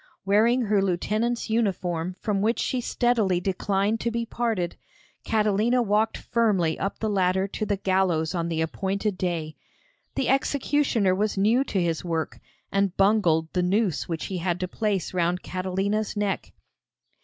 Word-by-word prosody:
Wearing 225 Hz, +5 st, +3 dB
her 210 Hz, -2 st, +2 dB
lieutenant's 215 Hz, +6 st, 0 dB
uniform 185 Hz, -6 st, -1 dB
from 205 Hz, -2 st, -1 dB
which 225 Hz, +3 st, +1 dB
she 255 Hz, -, -1 dB
steadily 225 Hz, -7 st, +1 dB
declined 195 Hz, +3 st, 0 dB
to 235 Hz, -, -1 dB
be 235 Hz, 0 st, -2 dB
parted, 225 Hz, -7 st, -2 dB, 0.5 s
Catalina 215 Hz, +3 st, +2 dB
walked 215 Hz, +1 st, +1 dB
firmly 200 Hz, -9 st, +1 dB
up 195 Hz, -, -2 dB
the 220 Hz, -, -2 dB
ladder 190 Hz, -1 st, +1 dB
to 215 Hz, -, -3 dB
the 200 Hz, -1 st, 0 dB
gallows 185 Hz, -4 st, +1 dB
on 170 Hz, -2 st, -1 dB
the 160 Hz, -1 st, -1 dB
appointed 195 Hz, +5 st, -1 dB
day. 170 Hz, -4 st, -3 dB, 0.6 s
The 270 Hz, -, 0 dB
executioner 270 Hz, -6 st, +2 dB
was 205 Hz, +2 st, -1 dB
new 220 Hz, +7 st, +3 dB
to 195 Hz, -, -1 dB
his 170 Hz, -3 st, -1 dB
work, 165 Hz, -2 st, -3 dB, 0.3 s
and 195 Hz, -2 st, 0 dB
bungled 180 Hz, -6 st, +3 dB
the 180 Hz, -, +1 dB
noose 185 Hz, -1 st, 0 dB
which 165 Hz, -2 st, -3 dB
he 185 Hz, -2 st, -3 dB
had 175 Hz, 0 st, -1 dB
to 185 Hz, -, -1 dB
place 200 Hz, -3 st, -2 dB
round 180 Hz, 0 st, 0 dB
Catalina's 195 Hz, +4 st, -2 dB
neck. 205 Hz, -2 st, -2 dB
195 Hz, 155 wpm, -25 LUFS, 180-220 Hz, 0.6 s, Wearing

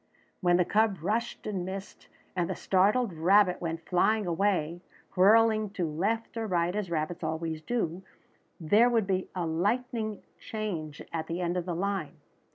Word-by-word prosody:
When 175 Hz, -1 st, +3 dB
the 180 Hz, -, +3 dB
cub 215 Hz, +1 st, +2 dB
rushed 230 Hz, +5 st, -2 dB
and 195 Hz, -4 st, -2 dB
missed, 190 Hz, +1 st, -7 dB, 0.3 s
and 175 Hz, -2 st, 0 dB
the -, -, -2 dB
startled 200 Hz, +3 st, +2 dB
rabbit 180 Hz, +3 st, +4 dB
went 165 Hz, -1 st, -4 dB
flying 210 Hz, +4 st, +2 dB
away, 175 Hz, -2 st, 0 dB, 0.3 s
whirling 215 Hz, +2 st, +5 dB
to 180 Hz, -, +1 dB
left 205 Hz, +11 st, -2 dB
or 225 Hz, -1 st, -2 dB
right 175 Hz, -1 st, 0 dB
as 210 Hz, -4 st, -2 dB
rabbits 170 Hz, +2 st, -2 dB
always 160 Hz, 0 st, -3 dB
do, 185 Hz, -3 st, -2 dB, 0.6 s
there 210 Hz, +9 st, +4 dB
would 230 Hz, -4 st, +2 dB
be 190 Hz, -1 st, -1 dB
a 175 Hz, -2 st, -1 dB
lightning 215 Hz, +6 st, -1 dB, 0.2 s
change 170 Hz, -9 st, -5 dB
at 160 Hz, -1 st, -3 dB
the 170 Hz, +1 st, -3 dB
end 175 Hz, 0 st, -1 dB
of 180 Hz, -2 st, -2 dB
the 175 Hz, -, -2 dB
line. 195 Hz, -3 st, -2 dB
185 Hz, 165 wpm, -29 LUFS, 170-215 Hz, 0.6 s, whirling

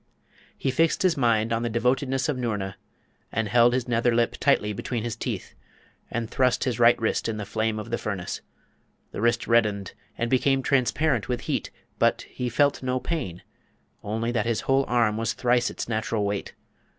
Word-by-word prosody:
He 135 Hz, -, 0 dB
fixed 165 Hz, +6 st, +2 dB
his 180 Hz, -3 st, +3 dB
mind 115 Hz, -3 st, +2 dB
on 115 Hz, -, 0 dB
the 120 Hz, -, -1 dB
devotedness 130 Hz, +3 st, +1 dB
of 150 Hz, -, 0 dB
Noorna, 105 Hz, -6 st, -3 dB, 0.6 s
and 110 Hz, 0 st, -1 dB
held 120 Hz, +3 st, +5 dB
his 130 Hz, -1 st, -1 dB
nether 120 Hz, 0 st, +2 dB
lip 120 Hz, 0 st, +2 dB
tightly 105 Hz, -7 st, +2 dB
between 115 Hz, +3 st, -3 dB
his 120 Hz, -1 st, -3 dB
teeth, -, -, -5 dB, 0.6 s
and 115 Hz, -1 st, -2 dB
thrust 125 Hz, +2 st, +1 dB
his 125 Hz, -4 st, -1 dB
right 120 Hz, 0 st, +6 dB
wrist 115 Hz, 0 st, 0 dB
in 110 Hz, -, -3 dB
the 105 Hz, -, -4 dB
flame 110 Hz, +1 st, -1 dB
of 110 Hz, +2 st, -6 dB
the 120 Hz, -, -1 dB
furnace. 100 Hz, -5 st, -4 dB, 0.7 s
The -, -, -5 dB
wrist 120 Hz, 0 st, +2 dB
reddened, 105 Hz, -5 st, +1 dB, 0.2 s
and 120 Hz, -, 0 dB
became 135 Hz, +2 st, +2 dB
transparent 135 Hz, -1 st, +1 dB
with 120 Hz, -1 st, -1 dB
heat, -, -, -2 dB, 0.3 s
but -, -, +2 dB
he 125 Hz, -1 st, -3 dB
felt 140 Hz, +4 st, +2 dB
no 130 Hz, 0 st, -1 dB
pain, 125 Hz, -, -4 dB, 0.6 s
only 115 Hz, +3 st, -2 dB
that 115 Hz, -2 st, 0 dB
his 115 Hz, -2 st, 0 dB
whole 135 Hz, 0 st, +2 dB
arm 115 Hz, -3 st, +2 dB
was 115 Hz, +1 st, -1 dB
thrice 120 Hz, 0 st, +2 dB
its -, -, -5 dB
natural 110 Hz, -1 st, -1 dB
weight. 100 Hz, -1 st, -3 dB
120 Hz, 185 wpm, -25 LUFS, 110-125 Hz, 0.7 s, right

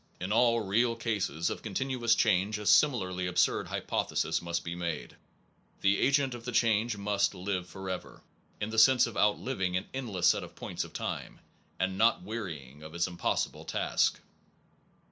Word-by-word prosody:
In 90 Hz, +3 st, -4 dB
all 115 Hz, +1 st, +4 dB
real 115 Hz, +4 st, +1 dB
cases 100 Hz, -9 st, -1 dB
of -, -, -5 dB
continuous 120 Hz, +2 st, 0 dB
change 105 Hz, 0 st, +2 dB
a 105 Hz, -, -7 dB
similarly 95 Hz, -10 st, +3 dB
absurd 90 Hz, -, +1 dB
hypothe -, -, -2 dB
sis -, -, +1 dB
must 85 Hz, 0 st, -3 dB
be 85 Hz, -, -4 dB
made: 85 Hz, -3 st, -4 dB, 0.7 s
the 100 Hz, +1 st, +3 dB
agent 135 Hz, -1 st, +2 dB
of 120 Hz, -1 st, -8 dB
the 125 Hz, -, -4 dB
change 115 Hz, -1 st, +2 dB
must 100 Hz, 0 st, 0 dB
live 90 Hz, -1 st, -3 dB
forever, 95 Hz, -1 st, -7 dB, 0.4 s
in 105 Hz, +1 st, -3 dB
the 110 Hz, -, +2 dB
sense 130 Hz, +2 st, +6 dB
of 120 Hz, -3 st, -7 dB
outliving 105 Hz, -3 st, +1 dB
an 95 Hz, -, -3 dB
endless 115 Hz, -9 st, -2 dB
set -, -, +4 dB
of -, -, -11 dB
points -, -, -4 dB
of -, -, -10 dB
time, -, -, -5 dB, 0.4 s
and 95 Hz, 0 st, -1 dB
not 115 Hz, +1 st, +3 dB
wearying 80 Hz, -, -6 dB
of 80 Hz, +1 st, -10 dB
his 85 Hz, 0 st, +1 dB
impossible 90 Hz, -1 st, -2 dB
task. -, -, 0 dB
100 Hz, 165 wpm, -30 LUFS, 90-115 Hz, 0.7 s, sense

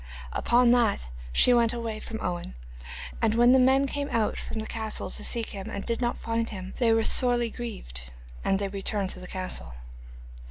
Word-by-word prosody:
Upon 240 Hz, 0 st, +4 dB
that 230 Hz, -, +2 dB, 0.2 s
she 245 Hz, -, +6 dB
went 235 Hz, -1 st, +3 dB
away 230 Hz, -2 st, -4 dB
from 220 Hz, 0 st, -6 dB
Owen, 175 Hz, -, -4 dB, 0.7 s
and 225 Hz, -1 st, +2 dB
when 240 Hz, +1 st, +6 dB
the 260 Hz, -, +6 dB
men 265 Hz, +2 st, +4 dB
came 285 Hz, +1 st, -3 dB
out 225 Hz, -4 st, 0 dB
from -, -, -6 dB
the 220 Hz, -, -3 dB
castle 220 Hz, -1 st, -3 dB
to -, -, -3 dB
seek 230 Hz, -2 st, +1 dB
him 195 Hz, -2 st, -6 dB
and 200 Hz, -, -5 dB
did 235 Hz, +1 st, -2 dB
not 240 Hz, 0 st, 0 dB
find 230 Hz, 0 st, -2 dB
him 190 Hz, -2 st, -7 dB
they 235 Hz, -3 st, +4 dB
were 225 Hz, 0 st, +3 dB
sorely 240 Hz, -2 st, +3 dB
grieved, 60 Hz, -, -7 dB, 0.3 s
and 195 Hz, -, +2 dB
they 200 Hz, 0 st, -2 dB
returned 195 Hz, 0 st, -1 dB
to -, -, -6 dB
the 180 Hz, -, -6 dB
castle. 185 Hz, -, -3 dB
225 Hz, 195 wpm, -27 LUFS, 200-240 Hz, 0.7 s, she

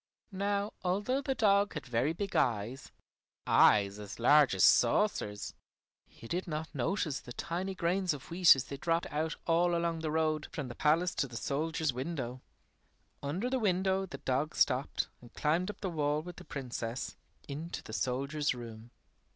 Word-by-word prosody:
Now 200 Hz, +1 st, -1 dB
although 205 Hz, +9 st, 0 dB
the 270 Hz, -1 st, -1 dB
dog 200 Hz, -4 st, +3 dB
had 150 Hz, -, -5 dB
very 125 Hz, +4 st, +1 dB
big 195 Hz, +4 st, -4 dB
eyes, 120 Hz, +2 st, 0 dB, 0.5 s
eyes 100 Hz, 0 st, +5 dB
as 100 Hz, -3 st, -8 dB
large 145 Hz, -1 st, +5 dB
as 95 Hz, -, +2 dB
saucers, 115 Hz, -, +3 dB, 0.5 s
he 115 Hz, -, -13 dB
did 180 Hz, +8 st, -2 dB
not 155 Hz, 0 st, -4 dB
notice 145 Hz, +1 st, -1 dB
the 125 Hz, -, -12 dB
tiny 185 Hz, +7 st, -3 dB
grains 180 Hz, +1 st, +1 dB
of 145 Hz, +2 st, -7 dB
wheat 175 Hz, -3 st, +7 dB
as 135 Hz, -, -2 dB
they 140 Hz, -, -7 dB
dropped 165 Hz, +3 st, 0 dB
out 155 Hz, +2 st, -1 dB
all 170 Hz, +1 st, +3 dB
along 170 Hz, -1 st, 0 dB
the 160 Hz, -1 st, -2 dB
road 155 Hz, -1 st, 0 dB
from 140 Hz, -5 st, -5 dB
the -, -, -6 dB
palace 165 Hz, +7 st, +2 dB
to 135 Hz, -, -1 dB
the 120 Hz, -2 st, -7 dB
soldier's 155 Hz, +3 st, -1 dB
window. 130 Hz, -2 st, -4 dB, 0.8 s
Under 170 Hz, +12 st, -2 dB
the 260 Hz, +1 st, 0 dB
window 190 Hz, -2 st, +1 dB
the 175 Hz, -, -7 dB
dog 135 Hz, +4 st, -1 dB
stopped 130 Hz, 0 st, +1 dB
and 120 Hz, -1 st, -16 dB
climbed 165 Hz, +5 st, +1 dB
up 210 Hz, -, -8 dB
the 190 Hz, -, -1 dB
wall 150 Hz, -1 st, 0 dB
with 175 Hz, 0 st, -9 dB
the -, -, -11 dB
Princess, 125 Hz, -4 st, -5 dB, 0.3 s
into 155 Hz, +4 st, -5 dB
the 110 Hz, -, -9 dB
soldier's 140 Hz, +4 st, -1 dB
room. 115 Hz, -1 st, -9 dB
155 Hz, 170 wpm, -32 LUFS, 130-180 Hz, 0.8 s, wheat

